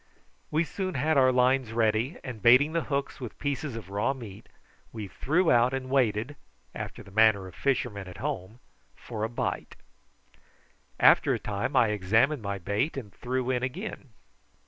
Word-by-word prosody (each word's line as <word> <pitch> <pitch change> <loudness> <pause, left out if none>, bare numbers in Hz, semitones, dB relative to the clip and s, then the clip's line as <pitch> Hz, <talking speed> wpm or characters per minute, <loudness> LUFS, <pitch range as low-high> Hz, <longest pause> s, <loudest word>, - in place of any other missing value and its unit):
We 155 +2 +2
soon 185 +1 -4
had 155 +5 +1
our 130 -2 +5
lines 125 -1 +2
ready, 115 +6 +1
and 120 -5 -7
baiting 130 +8 +6
the 165 - 0
hooks 140 -1 -2
with 120 -5 -7
pieces 140 -2 -3
of 100 -4 -8
raw 105 +7 0
meat, 110 -4 -11 0.4
we 110 -3 -6
threw 160 - +1
out 120 +2 +4
and 130 -1 -5
waited, 125 0 +1 0.4
after - - -7
the 95 - -15
manner 110 -2 +4
of 90 - -12
fishermen 115 -7 -1
at 90 -1 -10
home, 95 +5 -4 0.4
for 110 -3 -6
a 110 - 0
bite. 120 - -3 1.2
After - - +5
a - - -4
time 100 -1 -3
I 115 - +5
examined 110 +8 +2
my 100 -1 -3
bait 100 - -1
and 105 -7 -7
threw 130 +1 -2
in 125 -1 0
again. 140 - -5
120 Hz, 170 wpm, -28 LUFS, 105-135 Hz, 1.2 s, baiting